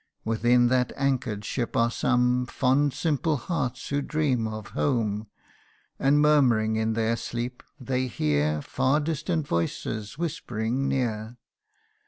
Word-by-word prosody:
Within 120 +2 +3
that 125 -1 +2
anchor'd 125 -7 -1
ship 120 +1 -2
are 115 0 +3
some 125 0 +1
Fond 140 +4 +2
simple 155 +1 0
hearts 130 -4 -3
who 145 0 0
dream 135 -7 0
of 110 -2 -6
home; 110 -5 -1 0.7
And 140 +2 +4
murmuring 125 -8 +4
in 110 0 0
their 115 +1 +1
sleep, 120 +2 -4 0.2
they 130 0 -1
hear 75 - 0
Far 135 +3 +1
distant 155 +1 -1
voices 105 - -2
whispering 130 -5 -2
near. 115 -3 -2
125 Hz, 125 wpm, -26 LUFS, 110-140 Hz, 0.7 s, And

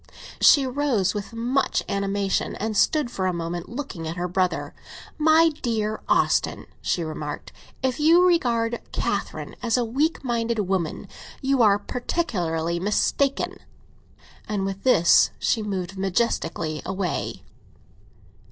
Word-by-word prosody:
She 280 -2 +6
rose 255 -8 +1
with 205 -1 -5
much 240 +4 0
animation, 200 0 -1
and 215 +1 -3
stood 290 +3 +2
for 185 -4 -1
a 185 - 0
moment 170 0 -4
looking 235 - -6
at 160 - -4
her 180 0 -2
brother. 180 0 -1 0.5
"My 320 +2 +5
dear 215 -3 -1
Austin," - - +2 0.2
she 175 - 0
remarked, 155 -2 -6 0.3
"if 260 +1 0
you 335 +4 +6
regard 235 -9 +1
Catherine - - -3
as 235 0 +1
a 245 - +1
weak 285 +9 0
minded 235 -2 -1
woman, 185 -4 -2 0.3
you 270 -2 +1
are 205 -3 +5
particularly 175 - -2
mistaken!" 265 +8 0 0.9
And 200 -2 -1
with 195 0 -4
this 170 - +5
she 225 - +1
moved 195 -3 -4
majestically 175 -6 -1
away. 190 -2 -3
210 Hz, 125 wpm, -24 LUFS, 180-255 Hz, 0.9 s, She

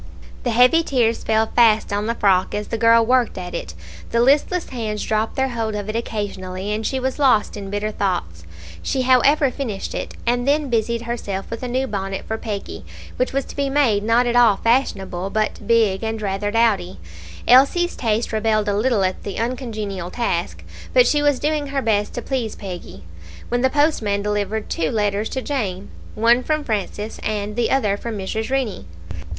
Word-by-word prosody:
The 245 - -2
heavy 250 +8 +5
tears 240 -7 0
fell 220 0 +2
fast 220 -3 +4
on 205 +1 -1
the 230 - -1
frock 190 -4 +2
as 210 0 -4
the 230 - -2
girl 230 0 +5
worked 250 -3 +2
at 180 -1 -6
it; 85 -2 -5 0.3
the 235 - +1
listless 290 +8 +2
hands 220 -4 -3
dropped 220 +1 -1
their 265 0 +1
hold 225 -3 -2
of 205 0 -4
it 215 - -3
occasionally, 200 -4 -4
and 215 +1 -2
she 265 +4 -1
was 260 +2 -2
lost 255 -7 +3
in 200 -2 -7
bitter 205 +1 -2
thoughts. 175 - -2 0.4
She 260 - -1
however 260 +2 +4
finished 230 -8 -4
it, - - -5
and 245 +2 0
then 290 -2 +1
busied 230 0 0
herself 215 -5 -4
with 230 - -5
a 250 - -3
new 255 +2 0
bonnet 195 -4 -4
for 220 0 -4
Peggy, 205 -3 -5 0.3
which 255 - 0
was 275 0 -1
to - - -11
be 280 -1 0
made 265 -8 +2
not 230 +3 +3
at 240 0 0
all 235 -5 +5
fashionable, 195 -7 0
but 215 +2 -2
big 220 -5 +3
and 225 0 -2
rather 205 0 -2
dowdy. 205 -5 +1 0.5
Elsie's 280 +8 +5
taste 225 -1 -1
rebelled 215 -1 +1
a 200 - +1
little 220 -1 +2
at 185 0 -1
the 200 - -6
uncongenial 215 -7 -3
task; 235 +5 -2 0.3
but - - +6
she 295 - +2
was 290 -2 +3
doing 300 -1 -1
her 275 0 -1
best 210 -2 0
to 240 - -4
please 245 -5 -2
Peggy 185 - -8 0.5
when 245 0 0
the 260 - +3
postman 255 -9 +1
delivered 210 +1 -2
two 160 -2 -1
letters 210 0 0
to 260 - -4
Jane 205 -9 -3 0.2
one 235 +3 +4
from 305 +3 -1
Francis, 210 -2 -3
and 210 -1 -3
the 240 -1 +1
other 210 -7 +1
from 230 0 -5
Mrs. 220 +4 -3
Rennie. 260 - -2
225 Hz, 190 wpm, -21 LUFS, 205-255 Hz, 0.5 s, but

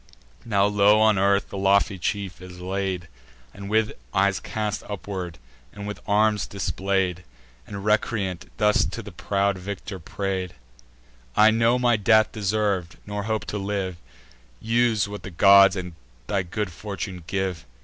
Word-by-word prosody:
Now 100 -4 +2
low 105 +1 +4
on 110 -2 +4
earth 100 +1 +2
the 100 - -5
lofty 100 0 +3
chief 95 0 -3
is 90 -1 -10
laid, 95 -1 -3 0.5
With 105 +2 0 0.2
eyes 100 0 +3
cast 105 -1 -3
upward, 95 -3 -5 0.3
and 100 0 -8
with 105 0 -5
arms 105 0 +2
display'd, 95 -2 -1 0.4
And, 100 0 -7
recreant, 105 -4 0
thus 105 -2 +3
to - - -4
the - - -9
proud 100 -1 0
victor 100 0 -6
pray'd: 95 +1 -4 0.8
"I 110 +1 +6
know 115 +2 +3
my 120 -2 +3
death 110 +1 +4
deserv'd, 100 -4 -1
nor 105 0 -4
hope 110 -1 -1
to 105 - -2
live: 95 -3 -3 0.6
Use 115 -2 +2
what 105 0 -7
the - - -7
gods 100 +2 +7
and 90 -2 -5 0.3
thy 100 -2 0
good 95 +2 -4
fortune 95 -1 -6
give. 95 -3 -2
100 Hz, 145 wpm, -24 LUFS, 95-105 Hz, 0.8 s, gods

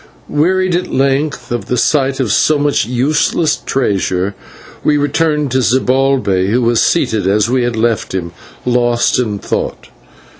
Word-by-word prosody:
Wearied 185 +4 +1
at 180 - -1
length 140 +2 -1
by 120 - +1
the 125 +1 -3
sight 135 0 +1
of 125 -6 0
so 155 +7 +3
much 145 -4 +1
useless 150 +5 +1
treasure, 100 -6 -1 0.5
we 150 - +2
returned 150 0 0
to 130 +1 +1
Zibalbay, 130 -4 +1
who 120 +5 +1
was 115 -1 +2
seated 105 -4 +1
as 105 +4 +1
we 130 0 +2
had 120 -1 -1
left 110 -3 -1
him, 85 -2 -3 0.3
lost 120 0 +1
in 110 -5 -1
thought. - - -4
125 Hz, 150 wpm, -14 LUFS, 110-145 Hz, 0.5 s, so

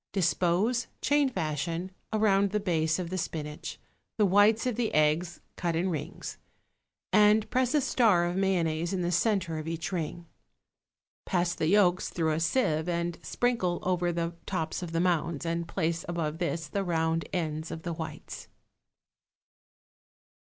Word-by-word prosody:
Dispose, 190 +6 +1
chain 285 -1 +3
fashion, 165 - -2 0.2
around 200 -2 +3
the 210 +2 0
base 160 -5 +1
of 180 -2 -4
the 185 - -1
spinach, 150 -2 -5 0.4
the 210 - +4
whites 205 +4 +4
of 250 -3 0
the 230 -1 0
eggs 155 +3 +2 0.2
cut 170 -2 -1
in 180 +3 0
rings, 155 +2 -5 0.7
and 210 +1 +5
press 255 +2 +2
a 295 - +4
star 215 -10 +3
of 175 +1 -2
mayonnaise 175 -3 +1
in 180 -2 -1
the 175 - 0
centre 175 -3 +1
of 155 - -6
each 165 +2 -3
ring. 170 -1 -3 1.0
Pass 175 -2 +1
the 155 - -1
yolks 185 -1 +3
through 160 -2 0
a 155 - 0
sieve 165 -3 +1
and 170 0 -2
sprinkle 230 -8 0
over 180 -1 +1
the 170 0 -2
tops 160 -4 -2
of 175 -2 -5
the 165 - 0
mounds, 170 -3 0
and 170 0 -2
place 165 -2 -1
above 165 -2 -2
this 170 -2 -2
the 200 +6 -2
round 165 -2 0
ends 160 -2 -2
of 160 - -6
the 170 - -3
whites. 160 0 -7
175 Hz, 155 wpm, -29 LUFS, 165-195 Hz, 1.0 s, and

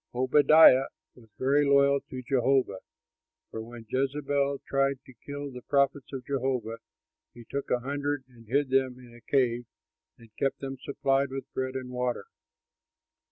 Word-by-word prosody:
Obadiah 135 +1 +6 0.3
was 115 -3 -19
very 140 +3 +3
loyal 140 0 +4
to 130 -1 -7
Jehovah; 130 -5 +1 0.7
for 110 - -5
when 115 0 -10
Jezebel 140 +2 0
tried 135 0 +1
to 130 - -15
kill 145 0 -6
the 125 -1 -9
prophets 140 0 0
of 130 -2 -6
Jehovah, 125 -5 -2 0.6
he 120 -1 -12
took 140 0 -4
a 125 - +1
hundred 145 +1 -2
and 120 -3 -19
hid 135 +3 0
them 130 -1 +1
in 125 -2 -15
a 120 - -15
cave 120 -2 +1 0.5
and 115 -2 -19
kept 135 - 0
them 135 -1 -5
supplied 135 -1 0
with 135 0 -7
bread 130 0 -3
and 130 -1 -5
water. 125 -1 -2
135 Hz, 155 wpm, -28 LUFS, 125-140 Hz, 0.7 s, Obadiah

